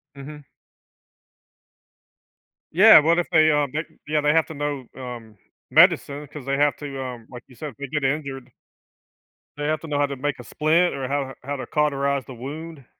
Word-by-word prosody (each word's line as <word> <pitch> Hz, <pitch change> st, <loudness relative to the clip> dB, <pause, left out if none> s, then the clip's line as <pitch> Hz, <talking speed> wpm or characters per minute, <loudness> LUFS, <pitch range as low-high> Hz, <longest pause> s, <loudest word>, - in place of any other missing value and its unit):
Mhm. 145 Hz, +1 st, -10 dB, 2.3 s
Yeah, 215 Hz, +5 st, +9 dB
what 165 Hz, +3 st, +3 dB
if 175 Hz, -, -2 dB
they, 155 Hz, -1 st, +5 dB
um, 145 Hz, -2 st, +1 dB
they 155 Hz, +3 st, -2 dB, 0.2 s
yeah, 150 Hz, 0 st, +1 dB
they 150 Hz, 0 st, +3 dB
have 165 Hz, 0 st, +3 dB
to 160 Hz, -, -8 dB
know, 145 Hz, -2 st, -3 dB
um, 120 Hz, -5 st, -9 dB, 0.3 s
medicine 145 Hz, +1 st, +4 dB
'cause 150 Hz, -1 st, -10 dB
they 140 Hz, 0 st, 0 dB
have 145 Hz, -2 st, +3 dB
to, 135 Hz, -2 st, -6 dB
um, 120 Hz, -3 st, -8 dB
like 125 Hz, -1 st, -10 dB
you 125 Hz, -, -17 dB
said, 150 Hz, +4 st, -6 dB
if 130 Hz, -, -16 dB
they 140 Hz, -, -5 dB
get 145 Hz, +1 st, -3 dB
injured 135 Hz, -2 st, -3 dB, 1.1 s
they 145 Hz, -, -4 dB
have 155 Hz, 0 st, -1 dB
to 165 Hz, -, -8 dB
know 145 Hz, -, -2 dB
how 145 Hz, -, +3 dB
to 140 Hz, -, -5 dB
make 140 Hz, 0 st, -3 dB
a 125 Hz, -, -8 dB
splint 165 Hz, +6 st, +1 dB
or 135 Hz, -1 st, -4 dB
how 135 Hz, -1 st, -2 dB
how 145 Hz, +2 st, -4 dB
to 130 Hz, -, -6 dB
cauterize 140 Hz, -2 st, 0 dB
the 130 Hz, -, -10 dB
wound. 145 Hz, +4 st, -8 dB
145 Hz, 195 wpm, -23 LUFS, 135-150 Hz, 2.3 s, Yeah